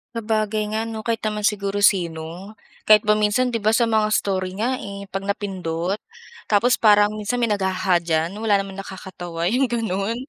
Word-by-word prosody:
Sabagay 215 Hz, -1 st, -1 dB
nga 220 Hz, +1 st, -2 dB
'no, 220 Hz, -1 st, -6 dB
kahit 230 Hz, -1 st, -1 dB
naman 210 Hz, 0 st, -3 dB
siguro 205 Hz, -1 st, 0 dB
sino, 175 Hz, +1 st, 0 dB, 0.3 s
kahit 215 Hz, -1 st, +7 dB
ba 210 Hz, 0 st, +3 dB
minsan 215 Hz, +4 st, +2 dB
di 230 Hz, -, -1 dB
ba 215 Hz, +1 st, +2 dB
sa 235 Hz, -, +3 dB
mga 220 Hz, -2 st, +2 dB
story 185 Hz, -2 st, -1 dB
nga 245 Hz, +5 st, -1 dB
eh, 200 Hz, -1 st, -7 dB
'pag 195 Hz, 0 st, -4 dB
napindot 190 Hz, -2 st, -2 dB, 0.5 s
tapos 225 Hz, +4 st, +3 dB
parang 210 Hz, -1 st, +5 dB
minsan 210 Hz, +3 st, -2 dB
may 235 Hz, -3 st, 0 dB
nag-"haha" 190 Hz, -2 st, +1 dB
diyan, 165 Hz, 0 st, -1 dB
wala 220 Hz, -2 st, +2 dB
naman 195 Hz, -1 st, -3 dB
nakakatawa 180 Hz, -3 st, -7 dB
yung 260 Hz, +3 st, +2 dB
ganun. 220 Hz, -2 st, -2 dB
205 Hz, 175 wpm, -22 LUFS, 190-220 Hz, 0.5 s, kahit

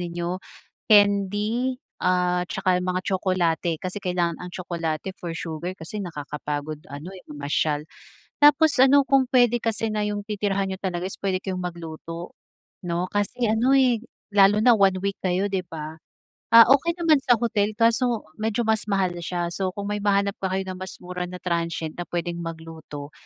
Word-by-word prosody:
ninyo, 175 Hz, +1 st, -3 dB, 0.5 s
candy 205 Hz, +4 st, +3 dB, 0.2 s
at 180 Hz, -1 st, +1 dB
tsaka 180 Hz, -1 st, +1 dB
yung 180 Hz, -, -3 dB
mga 180 Hz, 0 st, 0 dB
tsokolate. 180 Hz, -3 st, 0 dB
Kasi 185 Hz, +5 st, -5 dB
kailangan 175 Hz, -3 st, -1 dB
ang 180 Hz, -, -6 dB
tsokolate 170 Hz, -1 st, -4 dB
for 165 Hz, -2 st, -5 dB
sugar 165 Hz, +3 st, -5 dB
kasi 180 Hz, +6 st, -6 dB
nakakapagod 150 Hz, -3 st, -5 dB
ano, 145 Hz, +7 st, -8 dB
eh, 190 Hz, -, -10 dB
mamasyal. 145 Hz, +1 st, -1 dB, 0.5 s
Tapos 295 Hz, +1 st, +5 dB
ano, 270 Hz, +2 st, +6 dB
kung 275 Hz, -1 st, +3 dB
puwede 245 Hz, -2 st, +4 dB
kasi 225 Hz, -1 st, -1 dB
na 210 Hz, -1 st, -1 dB
yung 205 Hz, 0 st, -2 dB
titirahan 200 Hz, -2 st, -1 dB
niyo 190 Hz, -, -4 dB
talaga 185 Hz, -1 st, -3 dB
is -, -, -9 dB
puwede 190 Hz, -2 st, -1 dB
kayong 185 Hz, -2 st, -4 dB
magluto, 165 Hz, 0 st, -7 dB, 0.5 s
'no. 175 Hz, +1 st, -1 dB
Kasi 205 Hz, +3 st, -1 dB
ano, 235 Hz, +5 st, +3 dB
eh, 245 Hz, -4 st, +3 dB, 0.2 s
lalo 205 Hz, +1 st, +5 dB
na 240 Hz, -1 st, +6 dB
1 190 Hz, -2 st, +3 dB
week 200 Hz, 0 st, -2 dB
kayo, 185 Hz, +2 st, +1 dB
'di 190 Hz, -2 st, -2 dB
ba? 160 Hz, -1 st, -7 dB, 0.6 s
Ah, 230 Hz, -, +12 dB
okey 330 Hz, +5 st, +4 dB
naman 330 Hz, -4 st, +3 dB
sa 245 Hz, -, +6 dB
hotel 215 Hz, -2 st, 0 dB
kaso 230 Hz, +1 st, +2 dB, 0.2 s
medyo 220 Hz, +2 st, 0 dB
mas 220 Hz, -2 st, +1 dB
mahal 195 Hz, -3 st, +1 dB
siya. 175 Hz, 0 st, -3 dB
So, 185 Hz, 0 st, -2 dB
kung 200 Hz, 0 st, -4 dB
may 210 Hz, -, -1 dB
mahanap 200 Hz, -1 st, +1 dB
pa 190 Hz, -, -1 dB
kayo 190 Hz, 0 st, 0 dB
na 185 Hz, -1 st, -6 dB
mas 185 Hz, 0 st, -7 dB
mura 180 Hz, 0 st, -4 dB
na 180 Hz, -, -8 dB
transient 170 Hz, -2 st, -2 dB
na 175 Hz, -, -3 dB
pwedeng 170 Hz, 0 st, -3 dB
magluto, 160 Hz, -3 st, -8 dB
185 Hz, 175 wpm, -24 LUFS, 170-210 Hz, 0.6 s, Ah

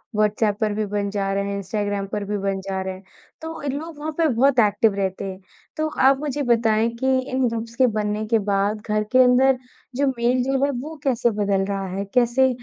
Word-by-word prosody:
WhatsApp 210 Hz, 0 st, +1 dB
पर 215 Hz, -1 st, +1 dB
भी 215 Hz, +1 st, -1 dB
बन 205 Hz, 0 st, -2 dB
जा 195 Hz, -1 st, -2 dB
रहे 200 Hz, 0 st, 0 dB
हैं 200 Hz, -, -2 dB
इंस्टग्राम 200 Hz, 0 st, -2 dB
पर 205 Hz, +1 st, -3 dB
भी 205 Hz, +1 st, -2 dB
बन 195 Hz, 0 st, -2 dB
जा 190 Hz, 0 st, -3 dB
रहे 190 Hz, 0 st, -4 dB
हैं 190 Hz, +1 st, -12 dB, 0.4 s
तो 320 Hz, 0 st, -6 dB
इन 285 Hz, -2 st, -2 dB
लोग 325 Hz, 0 st, -9 dB
वहाँ 310 Hz, +1 st, -3 dB
पे 330 Hz, -2 st, +3 dB
बहुत 255 Hz, +1 st, +3 dB
एक्टिव 210 Hz, 0 st, +3 dB
रहते 195 Hz, -1 st, -2 dB
हैं। 190 Hz, -1 st, -6 dB, 0.4 s
तो 310 Hz, 0 st, 0 dB, 0.2 s
आप 270 Hz, 0 st, +5 dB
मुझे 290 Hz, -1 st, -3 dB
बताएँ 225 Hz, -1 st, +3 dB
कि 265 Hz, 0 st, +2 dB
इन 260 Hz, -1 st, +1 dB
ग्रुप्स 230 Hz, 0 st, -4 dB
के 255 Hz, 0 st, +4 dB
बनने 210 Hz, 0 st, -1 dB
के 225 Hz, 0 st, +3 dB
बाद 205 Hz, +2 st, 0 dB
घर 215 Hz, 0 st, +1 dB
के 255 Hz, 0 st, +6 dB
अंदर 255 Hz, +1 st, +4 dB, 0.4 s
जो 280 Hz, +2 st, +1 dB
मेल 245 Hz, +2 st, +2 dB
जो 270 Hz, +1 st, 0 dB
है -, -, 0 dB
वो 315 Hz, +3 st, -7 dB
कैसे 245 Hz, -3 st, +2 dB
बदल 195 Hz, -1 st, +1 dB
रहा 195 Hz, -1 st, -3 dB
है? 195 Hz, +2 st, -4 dB
कैसे 250 Hz, +1 st, +3 dB
215 Hz, 225 wpm, -22 LUFS, 200-260 Hz, 0.4 s, के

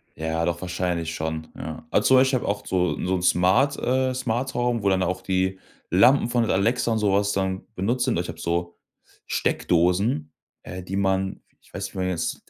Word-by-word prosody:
Ja, 80 Hz, +1 st, -1 dB
doch 85 Hz, 0 st, -2 dB
wahrscheinlich 90 Hz, -3 st, -2 dB
schon, 80 Hz, 0 st, -4 dB
ja. 80 Hz, +1 st, -7 dB
Also -, -, +2 dB
zum 130 Hz, -, +7 dB
Beispiel 130 Hz, 0 st, +4 dB
ich -, -, -7 dB
habe -, -, +1 dB
auch 100 Hz, -, -6 dB
so 90 Hz, -1 st, +1 dB
so 95 Hz, +1 st, +1 dB
'n 90 Hz, -, -2 dB
Smart, 95 Hz, +11 st, +3 dB
äh 130 Hz, +1 st, +1 dB
Smart-Home, 120 Hz, -2 st, -1 dB
wo 100 Hz, -, +3 dB
dann 95 Hz, -1 st, +2 dB
auch 90 Hz, +1 st, -2 dB
die 95 Hz, 0 st, -1 dB, 0.3 s
Lampen 115 Hz, -, +5 dB
von 120 Hz, -2 st, +1 dB
Alexa 115 Hz, +5 st, +1 dB
und 110 Hz, -, +1 dB
so 105 Hz, -2 st, +2 dB
was 100 Hz, +1 st, +2 dB
dann 95 Hz, -1 st, -2 dB
benutzt 115 Hz, +7 st, 0 dB
sind. -, -, 0 dB
Also, 85 Hz, -, 0 dB
ich -, -, -8 dB
habe 85 Hz, -, -7 dB
so 85 Hz, +1 st, -2 dB, 0.5 s
Steckdosen, 90 Hz, -1 st, +1 dB, 0.3 s
äh, 90 Hz, 0 st, -7 dB
die 95 Hz, +2 st, -5 dB
man 95 Hz, -1 st, 0 dB, 0.2 s
ich -, -, -25 dB
weiß -, -, -4 dB
nicht, -, -, -8 dB
wie -, -, -9 dB
man 95 Hz, -, 0 dB
die -, -, 0 dB
jetzt, 85 Hz, -3 st, -4 dB
95 Hz, 215 wpm, -24 LUFS, 90-115 Hz, 0.5 s, zum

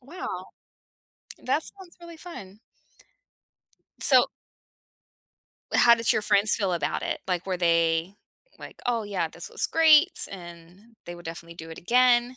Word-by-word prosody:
Wow. 325 Hz, +9 st, -7 dB, 0.9 s
That 285 Hz, +5 st, -1 dB
sounds 380 Hz, -3 st, -14 dB
really 340 Hz, -1 st, -12 dB
fun. 210 Hz, -, -11 dB, 1.4 s
So -, -, +5 dB, 1.5 s
How 235 Hz, -1 st, +7 dB
did 230 Hz, -1 st, +1 dB
your -, -, 0 dB
friends 205 Hz, 0 st, +2 dB
feel 195 Hz, -4 st, -1 dB
about 170 Hz, -, -2 dB
it? -, -, -3 dB
Like, 180 Hz, 0 st, -2 dB
were 185 Hz, -, -2 dB
they, 165 Hz, +1 st, +1 dB, 0.4 s
like, -, -, -12 dB
"Oh, 235 Hz, -3 st, 0 dB
yeah, 200 Hz, -2 st, -2 dB
this -, -, -9 dB
was -, -, -1 dB
greats," 325 Hz, +2 st, +4 dB
and, 180 Hz, +4 st, -13 dB
they 175 Hz, -, -8 dB
would 175 Hz, 0 st, -13 dB
definitely 165 Hz, +1 st, -8 dB
do 165 Hz, -1 st, -10 dB
it 160 Hz, -, -9 dB
again? 245 Hz, +3 st, +3 dB
205 Hz, 140 wpm, -26 LUFS, 175-255 Hz, 1.5 s, How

